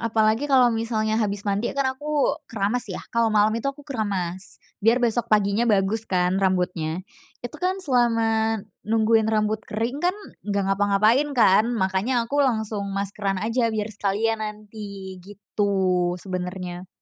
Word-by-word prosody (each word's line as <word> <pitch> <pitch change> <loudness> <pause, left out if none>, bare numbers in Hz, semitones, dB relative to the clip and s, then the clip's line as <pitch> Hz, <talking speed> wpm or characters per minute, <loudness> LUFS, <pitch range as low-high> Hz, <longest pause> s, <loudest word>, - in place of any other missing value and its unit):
apalagi 225 +4 +1
kalau 255 -3 +5
misalnya 225 -1 0
habis 205 -2 -2
mandi, 205 +3 0
kan 275 - +1
aku, 295 +1 0 0.2
keramas 225 +2 -1
ya, 185 - -4 0.2
kalau 230 -1 +3
malem 215 +1 +2
itu 275 - -1
aku 275 +1 -7
keramas, 200 - -3 0.2
biar 225 +4 +4
besok 235 0 0
paginya 210 +2 +2
bagus 210 +2 +1
kan, 180 +1 +1
rambutnya. 180 -3 0 0.4
Itu 270 +6 -7
kan, 370 +1 0
selama 225 -4 +2 0.3
nungguin 220 0 +3
rambut 215 0 +1
kering 230 +6 -2
kan, 360 +3 +1 0.3
enggak 200 -1 +1
ngapa-ngapain 205 +8 +3
kan, 215 -1 +5
makanya 200 +5 0
aku 285 +5 0
langsung 220 -6 0
maskeran 200 0 -2
aja, 230 +1 +1
biar 215 -1 -3
sekalian 215 +2 0
nanti, 205 -3 -7
gitu, 190 -2 -1
sebenarnya. 180 -1 -5
215 Hz, 140 wpm, -24 LUFS, 195-230 Hz, 0.4 s, kalau